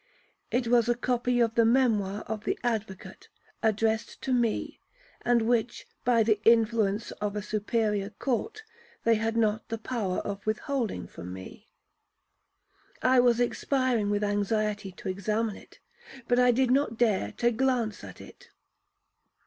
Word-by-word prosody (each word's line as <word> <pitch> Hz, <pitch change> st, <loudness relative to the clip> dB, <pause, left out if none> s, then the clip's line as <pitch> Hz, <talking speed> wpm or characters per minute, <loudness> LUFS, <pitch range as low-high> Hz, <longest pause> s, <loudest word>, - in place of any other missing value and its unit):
It 245 Hz, -1 st, 0 dB
was 240 Hz, -1 st, +3 dB
a 240 Hz, -, +3 dB
copy 245 Hz, 0 st, 0 dB
of 230 Hz, -1 st, +2 dB
the 230 Hz, -, +4 dB
memoir 220 Hz, -5 st, +2 dB
of 215 Hz, -1 st, -5 dB
the -, -, -1 dB
advocate, 220 Hz, -5 st, -4 dB, 0.3 s
addressed 220 Hz, 0 st, 0 dB
to 260 Hz, -, 0 dB
me, 240 Hz, -3 st, 0 dB, 0.4 s
and 240 Hz, -1 st, +2 dB
which, 235 Hz, 0 st, 0 dB, 0.2 s
by 235 Hz, -2 st, +4 dB
the 215 Hz, -1 st, +1 dB
influence 225 Hz, -2 st, +3 dB
of 210 Hz, 0 st, -2 dB
a 210 Hz, -, -3 dB
superior 210 Hz, -1 st, -1 dB
court, 275 Hz, -, -3 dB, 0.4 s
they 230 Hz, -, +4 dB
had 225 Hz, +1 st, 0 dB
not 215 Hz, -1 st, 0 dB
the 225 Hz, -, -2 dB
power 215 Hz, -5 st, -3 dB
of 200 Hz, -1 st, -5 dB
withholding 220 Hz, -, -2 dB
from 90 Hz, +1 st, -9 dB
me. 95 Hz, 0 st, -10 dB, 1.3 s
I 255 Hz, 0 st, +5 dB
was 245 Hz, -1 st, +4 dB
expiring 245 Hz, -3 st, 0 dB
with 205 Hz, 0 st, 0 dB
anxiety 205 Hz, 0 st, -1 dB
to 185 Hz, -, -9 dB
examine 210 Hz, +3 st, -1 dB
it, -, -, -16 dB, 0.5 s
but 245 Hz, 0 st, +3 dB
I 250 Hz, 0 st, +5 dB
did 250 Hz, +1 st, +3 dB
not 260 Hz, -4 st, +1 dB
dare 205 Hz, -, +1 dB
to 240 Hz, 0 st, +1 dB
glance 240 Hz, -3 st, 0 dB
at -, -, -10 dB
it. -, -, -14 dB
225 Hz, 150 wpm, -28 LUFS, 210-245 Hz, 1.3 s, I